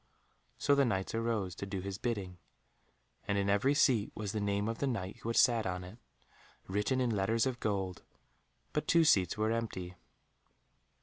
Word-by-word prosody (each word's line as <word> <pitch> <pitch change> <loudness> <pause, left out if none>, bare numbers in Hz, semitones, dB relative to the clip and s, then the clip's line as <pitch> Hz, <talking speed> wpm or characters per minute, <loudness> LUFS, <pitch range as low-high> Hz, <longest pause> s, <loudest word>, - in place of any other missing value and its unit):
So 145 - +3
the 140 0 +4
Knights 95 -7 -1
arose 115 -5 -1
to 100 - -6
do 95 -1 -3
his 100 +1 -5
bidding, 100 -7 -3 0.9
and 100 - +1
in 100 0 +1
every 130 +8 +3
seat 120 -8 +3
was 105 -2 -3
the 110 - -2
name 100 0 0
of 115 0 -3
the 140 - 0
Knight 105 -5 -3
who 115 0 -6
had 115 - -1
sat 115 -4 +4
on 90 -1 -3
it, 95 +7 -11 0.7
written 105 +7 0
in 125 -2 +1
letters 110 +4 +1
of 130 -2 -2
gold, 95 -3 -2 0.7
but 150 0 -1
two 170 -1 +5
seats 95 - +3
were 110 +1 +1
empty. 105 -6 -3
105 Hz, 180 wpm, -33 LUFS, 95-115 Hz, 0.9 s, two